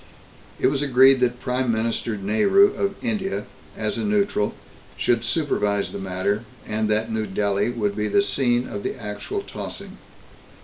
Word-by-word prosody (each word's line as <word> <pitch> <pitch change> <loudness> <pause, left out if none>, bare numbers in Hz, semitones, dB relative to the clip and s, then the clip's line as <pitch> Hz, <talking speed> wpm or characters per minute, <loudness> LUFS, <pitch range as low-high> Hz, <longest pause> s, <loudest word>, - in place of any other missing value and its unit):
It - - 0
was 135 +1 +2
agreed 135 -1 +6
that 125 -1 +1
Prime 125 -1 0
Minister 115 0 -1
Nehru 195 - +4
of 200 0 -1
India, 210 -5 -1 0.3
as - - -2
a - - -2
neutral, 205 - +1 0.4
should 120 -2 +1
supervise 105 -10 0
the - - -6
matter, 95 +3 -1 0.2
and 110 0 -1
that 110 +1 +1
New 110 -1 -1
Delhi 100 +2 0
would 105 -4 -1
be 105 0 -1
the 200 - +3
scene 125 -8 +1
of 100 - -5
the - - -4
actual 115 - -4
tossing. - - -8
115 Hz, 160 wpm, -23 LUFS, 105-140 Hz, 0.4 s, agreed